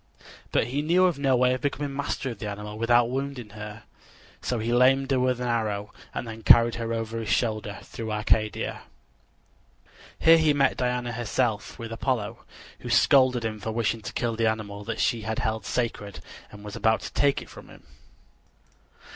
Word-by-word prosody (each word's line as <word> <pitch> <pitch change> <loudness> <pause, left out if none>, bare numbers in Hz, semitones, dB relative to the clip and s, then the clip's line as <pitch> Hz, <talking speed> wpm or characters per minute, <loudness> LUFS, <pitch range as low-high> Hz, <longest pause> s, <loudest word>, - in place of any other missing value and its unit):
But - - +2
he 140 +3 -1
knew 175 +5 +3
of 175 -6 +1
no 135 -2 +3
way 125 0 +3
of 130 - -3
becoming 145 -1 -2
master 140 -2 -2
of 115 - -9
the 105 - -4
animal 105 +1 -6
without 120 +1 +3
wounding 135 -4 -4
her, 105 +1 -9 0.6
so 125 - -1
he 115 +2 -1
lamed 135 +2 +4
her 130 - +3
with 125 -1 +1
an 125 - -2
arrow 105 -3 -2 0.2
and - - -5
then 110 0 -8
carried 115 +1 +6
her 115 0 -3
over 115 0 -3
his 110 -2 -5
shoulder 110 -1 0
through 110 -1 -6
Arcadia. 105 0 0 1.4
Here 165 0 +6
he 155 -2 +4
met 140 -1 +2
Diana 125 -1 -1
herself 115 -2 -1
with 115 -1 -7
Apollo, 115 -3 -2 0.4
who - - -7
scolded 130 -3 +4
him 110 -1 -3
for 110 +2 -4
wishing 115 0 -1
to - - -7
kill 120 -2 -1
the 115 0 +2
animal 105 -2 -4
that 115 -1 -4
she 115 - +1
had 110 +1 -3
held 110 -2 -2
sacred, 110 -5 -3 0.3
and 105 0 -12
was 105 - -7
about 110 0 +2
to - - -7
take 140 -1 +2
it - - -16
from - - -12
him. - - -15
115 Hz, 190 wpm, -26 LUFS, 110-130 Hz, 1.4 s, carried